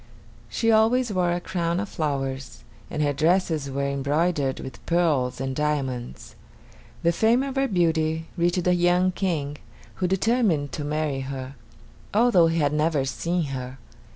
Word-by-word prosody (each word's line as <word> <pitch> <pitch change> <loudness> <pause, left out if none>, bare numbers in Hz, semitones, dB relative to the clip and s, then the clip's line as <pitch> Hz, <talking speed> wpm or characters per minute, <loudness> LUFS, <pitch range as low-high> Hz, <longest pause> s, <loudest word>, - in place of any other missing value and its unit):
She 230 -1 +1
always 225 +1 +3
wore 180 -2 +1
a 175 - 0
crown 175 -1 -2
of 210 - -3
flowers, 135 - -3 0.3
and 150 - -1
her 145 -1 +1
dresses 160 -1 +1
were 140 +1 -1
embroidered 140 +1 0
with 130 - -9
pearls 155 -8 +1
and 135 0 -3
diamonds. 130 - -3 0.7
The 170 - +4
fame 225 +8 +3
of 275 -1 -4
her 270 0 +2
beauty 160 -4 +1
reached 175 0 +1
a 180 - +4
young 180 +1 +3
King, 155 -7 -2 0.4
who 185 - 0
determined 190 - +1
to 150 - -4
marry 150 -2 -1
her, 135 0 -6 0.6
although 215 -7 +5
he 165 0 0
had 145 -2 +1
never 150 -2 +1
seen 170 +5 -1
her. 130 0 -6
160 Hz, 155 wpm, -25 LUFS, 140-180 Hz, 0.7 s, although